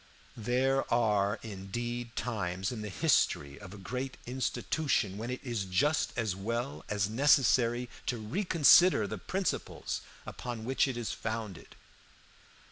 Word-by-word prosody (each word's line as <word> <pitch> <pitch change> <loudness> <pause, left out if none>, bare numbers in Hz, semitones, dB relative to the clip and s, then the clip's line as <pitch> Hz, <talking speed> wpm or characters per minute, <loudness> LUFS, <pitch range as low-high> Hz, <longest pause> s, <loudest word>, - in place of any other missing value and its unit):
"There 130 +4 +1
are 105 -3 +2
indeed 115 +4 -5
times 95 -5 -2
in 115 -3 -5
the 105 - -5
history 70 -5 +1
of 105 -3 -10
a 105 - -9
great 125 +7 -5
institution 125 -3 -1
when 110 +4 -5
it 125 - -3
is 120 -6 -2
just 145 +12 +1
as 110 -6 0
well 115 +7 -3
as 105 -1 +1
necessary 125 -1 +3 0.2
to 120 - 0
reconsider 165 - +5
the 105 0 -5
principles 190 - -3 0.2
upon 120 -3 -6
which 130 +2 +2
it 130 -3 -3
is 120 -2 -3
founded. 110 -6 -5
115 Hz, 130 wpm, -31 LUFS, 105-125 Hz, 0.2 s, reconsider